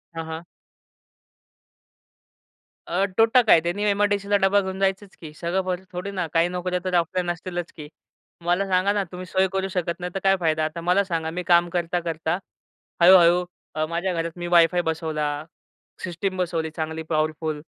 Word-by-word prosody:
हां, 165 0 -4
हां. 160 +1 -6 2.4
अ, 185 +3 +1
तोटा 230 +3 +5
काय, 165 - +7
त्यांनी 175 +5 -2
एम-आय-डी-सीला 205 0 +1
डब्बा 195 +1 +3
घेऊन 190 0 -5
जायचंच 195 0 -1
की 155 -2 -8
सगळं 185 +2 -2
थोडी 180 +3 -5
ना 185 -3 -2
काही 165 +1 +3
नोकऱ्या 180 0 -2
तर 185 - -2
ऑफलाईन 175 +1 0
असतीलच 175 0 -5
की! 150 -2 -9 0.6
मला 180 +3 +2
सांगा 190 +2 +2
ना, 205 -1 0
तुम्ही 180 0 -7
सोय 190 +2 +1
करू 190 0 -1
शकत 175 -2 -2
नाही, 180 0 -4
तर - - 0
काय 195 0 +4
फायदा? 160 -2 +1
आता 165 +2 -5
मला 180 +4 +3
सांगा, 165 -4 -2
मी 180 +1 -4
काम 175 0 +4
करता, 175 0 0
करता 165 0 -2 0.6
हळू-हळू 175 0 +7 0.4
माझ्या 175 +2 -1
घरात 165 0 -2
मी 175 0 -4
वायफाय 175 0 +4
बसवला, 160 -2 -1 0.8
सिस्टम 185 +2 -3
बसवली, 165 -3 -1
चांगली 160 0 -4
पॉवरफुल 155 0 -1
175 Hz, 160 wpm, -24 LUFS, 165-190 Hz, 2.4 s, काय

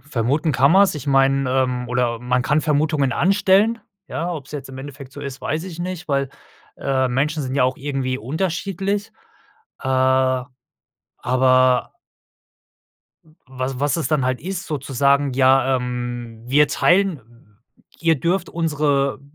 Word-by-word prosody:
vermuten 145 +4 -1
kann 135 +5 +4
man's. 195 -1 +5
Ich 150 -2 -7
meine 135 -1 +2
ähm, 125 -1 0
oder 125 -1 0
man 125 +1 0
kann 150 +4 +2
Vermutungen 150 -3 +1
anstellen, 200 - +3 0.3
ja? 170 +2 -3
Ob's 150 -4 -8
jetzt 140 -2 -6
im 130 0 -9
Endeffekt 135 -1 -9
so 145 - -9
ist, 140 -1 -7
weiß 155 +3 -2
ich 175 -3 -8
nicht, 175 -1 -5
weil, 140 -2 0 0.5
äh, 130 -1 0
Menschen 150 +5 0
sind 130 -1 -4
ja 140 - +3
auch 130 0 0
irgendwie 135 -2 -3
unterschiedlich. 190 - -2 0.7
Äh, 130 - -3 1.1
aber 130 0 +2 1.3
w 160 - -23 0.2
was 130 0 -4
was 145 +3 0
es 165 - -2
dann 150 -4 +1
halt 130 0 -1
ist, 185 +1 -5
sozusagen: 140 -1 +1
„Ja, 130 0 +3
ähm, 120 -2 -5
wir 145 +4 +4
teilen 130 - 0 0.4
ihr 165 -3 +2
dürft 180 +5 0
unsere 145 -5 0
140 Hz, 145 wpm, -21 LUFS, 130-160 Hz, 1.3 s, man's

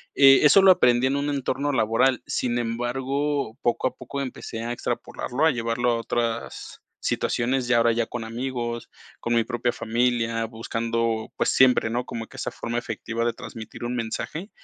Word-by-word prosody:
Eh, 135 -1 +8
eso 150 +6 +7
lo 190 -1 +8
aprendí 125 -7 +4
en 135 +2 0
un 145 +1 -1
entorno 140 0 -1
laboral, 125 +2 +2
sin 120 -1 -1
embargo, 130 +2 -2
poco 120 +1 +1
a - - -4
poco 140 - -6
empecé 120 -3 -6
a 120 - -3
extrapolarlo, 125 +3 -2
a 160 - +5
llevarlo 120 0 0
a - - +2
otras 115 0 -3 0.2
situaciones, 125 +1 0
ya 125 -1 +4
ahora 115 0 +4
ya 115 0 0
con 120 -2 -5
amigos, 120 0 -4 0.3
con 120 0 -1
mi 115 - +3
propia 120 +1 -1
familia, 115 0 0
buscando, 115 0 -2
pues, - - +1
siempre, 125 -3 +4
¿no? 120 +1 -1
Como 115 -1 -5
que - - -14
esa - - -3
forma 115 +1 -3
efectiva 115 0 -4
de 120 0 +1
transmitir 115 -2 -9
un 120 +1 -2
mensaje. 125 - -4
120 Hz, 175 wpm, -25 LUFS, 115-130 Hz, 0.3 s, Eh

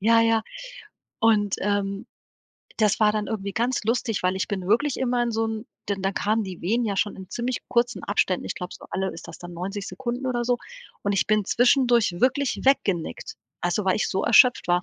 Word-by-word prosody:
ja, 230 +3 +5
ja 225 -1 +3 0.8
und, 210 -3 +3
ähm, 200 0 -1 0.7
das 215 -1 +2
war 210 -1 +5
dann 210 -1 -2
irgendwie 200 -3 -3
ganz 240 0 -1
lustig, 230 -2 0
weil 185 +1 +1
ich 190 - -2
bin 190 -3 -3
wirklich 245 +6 +2
immer 245 -1 +1
in 240 -1 -1
so 225 0 0
'n 220 +1 -5 0.2
denn 200 -2 -2
da 195 +1 0
kamen 215 +3 0
die 185 -3 -8
Wehen 230 +7 +1
ja 200 -2 -1
schon 205 +2 0
in 190 -1 -11
ziemlich 245 +1 -2
kurzen 240 0 +1
Abständen, 190 -2 0
ich - - -3
glaube 180 0 -7
so - - -12
alle 190 0 -2
ist 165 - -10
das - - -10
dann 175 0 -9
90 195 +4 -5
Sekunden 255 0 -4
oder 240 -2 -1
so 245 0 +1 0.4
und 200 - 0
ich 195 - +1
bin 215 -1 +2
zwischendurch 240 -3 +3
wirklich 270 +1 +1
weggenickt. 260 - 0 0.3
Also, 175 +3 0
weil 190 - +2
ich - - 0
so 190 - -1
erschöpft 245 -1 +5
war. 175 0 +3
215 Hz, 210 wpm, -25 LUFS, 195-240 Hz, 0.8 s, ja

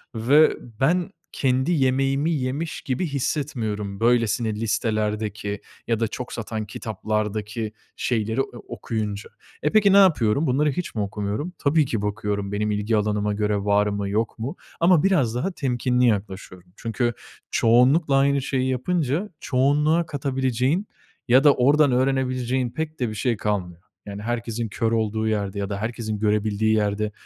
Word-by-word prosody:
ve 140 +8 +4 0.2
ben 175 +5 +2 0.2
kendi 130 +3 +1
yemeğimi 135 +1 +1
yemiş 145 +2 -2
gibi 130 +6 -2
hissetmiyorum 115 -8 -3
böylesine 115 -1 +2
listelerdeki 105 -2 -2 0.3
ya 115 -2 +1
da 115 - +1
çok 125 +4 -6
satan 110 -1 -4
kitaplardaki 110 +1 -3 0.2
şeyleri 110 -1 -1
e - - +1
o 120 - -10
okuyunca. 105 -2 -4 0.3
E, 150 - +1
peki 200 -2 +5
ne - - +7
yapıyorum? 150 - +4
Bunları 145 +4 +2
hiç 175 +1 -5
mi 110 - 0
okumuyorum? 105 - -3
Tabii 150 +1 +3
ki 115 -5 -2
bakıyorum 105 -1 -2
benim 105 +1 0
ilgi 105 +2 0
alanıma 105 0 0
göre 105 0 0
var 100 +1 +2
mı, 100 -1 -2
yok 110 +3 -1
mu 130 +9 -4 0.2
ama 170 -2 +4
biraz 140 - +2
daha 130 +11 -1
temkinli 125 -5 0
yaklaşıyorum. 95 -4 -3
Çünkü 120 +1 -1 0.4
çoğunlukla 130 +6 +4
aynı 140 0 +3
şeyi 130 -1 0
yapınca 155 - -1
çoğunluğa 150 +5 +2
katabileceğin 135 - -1 0.4
ya 130 +3 +5
da 145 - +7
oradan 140 +3 +4
öğrenebileceğin 130 -1 0
pek 155 +4 -5
de 125 -3 0
bir 110 - -6
şey 115 +1 0
kalmıyor. 90 -5 -3 0.2
Yani, 100 0 -7
herkesin 115 -1 -3
kör 115 +3 -1
olduğu 110 -1 0
yerde 100 -2 -2
ya 100 -1 -3
da 100 - -3
herkesin 110 0 -3
görebildiği 105 +1 +1
yerde 105 0 0
115 Hz, 150 wpm, -23 LUFS, 105-135 Hz, 0.4 s, ne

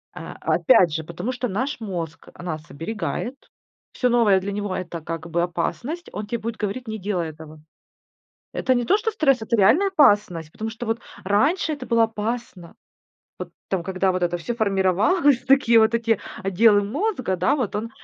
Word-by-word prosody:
А, - - -8
опять 205 - +4
же, 160 0 -2
потому 170 +10 -4
что 250 0 -3
наш 255 +8 -2
мозг 175 -7 -6
нас 155 -4 -6
оберегает, 170 - -4 0.6
всё 250 - 0
новое 220 -5 +4
для 200 +2 -4
него 205 -2 -3
это 170 -2 -5
как 165 +1 -6
бы 170 +1 0
опасность, 240 - -3
он 210 - -4
те 235 +2 -2
будет 225 +1 -5
говорить: 220 +4 -4
не 220 - -4
делай 185 -5 -2
этого. 155 0 -12 0.9
Это 260 - +1
не 245 - +1
то, 395 - +4
что 450 +1 -1
стресс, 275 - +2
это 220 +2 0
реальная 305 - +4
опасность, 205 - +3
потому 220 +1 -5
что 225 +2 -7
вот 225 +1 -1 0.2
раньше 280 - +2
это 280 -3 -7
было 230 -2 +3
опасно. 220 -5 -4 0.6
Вот - - -6 0.2
там 190 -3 -1
когда 190 +1 0
вот 185 -1 -1
это 175 0 0
всё 235 +8 -4
формировалось, 220 - +2
такие 260 -4 +5
вот 220 +1 +3
эти 230 -2 +1 0.2
отделы 205 +2 +4
мозга, 255 - -1
да, 185 +10 +2
вот 245 -8 -2
он 220 +2 -3
210 Hz, 180 wpm, -23 LUFS, 180-245 Hz, 0.9 s, такие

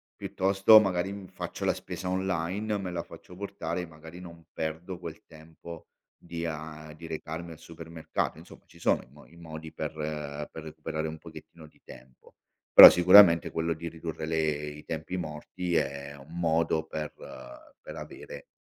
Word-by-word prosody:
piuttosto 95 +3 +5
magari 95 -2 0
mi 100 -2 -9
faccio - - -7
la - - +2
spesa 90 -1 -6
online, 95 +3 -1
me 95 -2 -4
la 85 -1 -3
faccio 90 - -13
portare, 90 -3 -4
magari 80 +2 -12
non 85 -2 -12
perdo 80 +3 -4
quel 85 -2 -9
tempo 80 +1 -12 0.3
di 85 -1 -6
ehm, 75 -1 -6
di 85 +1 -11
recarmi 80 +1 -6
al 80 - -11
supermercato, 80 -1 -5
insomma, - - -15
ci - - -19
sono - - +2
i - - -21
mo - - -16
i 85 - -20
modi 80 -1 -9
per 80 - -4 0.6
per 80 - -9
recuperare 80 0 -4
un 80 0 -7
pochettino 80 -2 -13
di - - -25
tempo. 65 -1 -16 0.4
Però - - +14
sicuramente 90 -1 +7
quello 85 0 -1
di 85 +1 -7
ridurre 80 -1 -6
le 75 -2 -1
i 75 +1 -10
tempi 80 +3 -4
morti 85 +2 -4
è 70 +1 -2
un 70 +4 -14
modo 80 -1 +1
per 75 -1 -5 0.7
per - - -10
avere - - -9
80 Hz, 165 wpm, -28 LUFS, 80-90 Hz, 0.7 s, Però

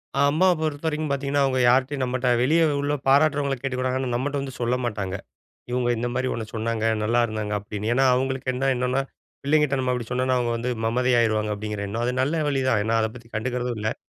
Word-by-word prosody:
அ, - - 0
அம்மாவ 185 +5 +4
பொறுத்தவரைக்கும் 155 0 -2
பாத்தீங்கன்னா, 140 +1 0
அவுங்க 130 -1 0
யார்ட்டயும் 130 +2 +2
நம்மட்ட 125 0 -1
வெளியே 160 +6 +3 0.2
உள்ள 145 +1 0
பாராட்டுறவங்கள 140 0 +3
கேட்டுக்கிடுவாங்க 130 -1 -1
ஆனா, 130 -2 -2
நம்மட்ட 140 +4 -2
வந்து 135 -1 -6
சொல்ல 120 +1 +1
மாட்டாங்க. 100 -5 -3 0.6
இவுங்க 125 0 0
இந்தமாரி 120 +2 -1
ஒன்ன 110 -1 -4
சொன்னாங்க, 110 0 -2 0.2
நல்லா 120 +3 +2
இருந்தாங்க 110 -2 -3
அப்பிடீன்னு. 105 +2 -4
ஏன்னா 135 +2 +3
அவுங்களுக்கு 130 0 -1
என்ன 135 +2 +1
என்னன்னா, 125 +2 0 0.4
பிள்ளைங்கிட்ட 145 -1 +2
நம்ம 130 -1 -1
அப்பிடி 120 -2 -3
சொன்னோன்னா, 130 +1 +1
அவுங்க 120 -1 0
வந்து 120 +2 -2 0.2
மமதை 125 +2 +1
ஆயிருவாங்க 110 -2 +1
அப்பிடீங்கிற 105 -1 -4
எண்ணம். 110 +4 -3
அது 125 +1 0
நல்ல 155 +4 0
வழி 135 -2 0
தான், 115 -5 +3
ஏன்னா 115 +1 +1
அத 110 - +1
பத்தி 115 -2 -13
கண்டுகிறதும் 125 +1 -2
இல்ல. 110 +1 -2
125 Hz, 195 wpm, -24 LUFS, 115-135 Hz, 0.6 s, அம்மாவ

